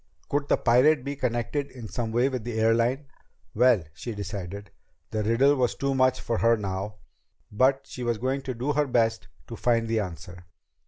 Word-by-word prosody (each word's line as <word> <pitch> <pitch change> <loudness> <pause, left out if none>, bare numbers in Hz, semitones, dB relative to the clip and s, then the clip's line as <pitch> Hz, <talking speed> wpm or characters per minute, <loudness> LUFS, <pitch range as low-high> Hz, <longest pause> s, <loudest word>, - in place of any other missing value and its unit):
Could 145 0 0
the - - +3
pirate 130 +4 +4
be 140 +1 -4
connected 130 +2 -2
in 120 -4 -9
some 115 0 -3
way 120 +3 +2
with 130 -4 -3
the 115 -1 -3
airline? 115 +5 +2 0.5
Well, 120 -4 +4
she 115 +6 -6
decided, 100 -1 -6 0.4
the 110 - -1
riddle 120 +7 +3
was 125 -3 0
too 140 0 -1
much 130 -1 +2
for 115 - -2
her 115 0 +4
now. 100 0 -4 0.6
But 135 +5 +2
she 125 - -9
was 120 -2 0
going 130 +4 -1
to 130 - -2
do 130 +6 -1
her 150 0 +1
best 115 -3 +1 0.2
to 115 - -8
find 115 -1 +1
the 115 0 +1
answer! 90 -1 -7
120 Hz, 190 wpm, -26 LUFS, 110-130 Hz, 0.6 s, pirate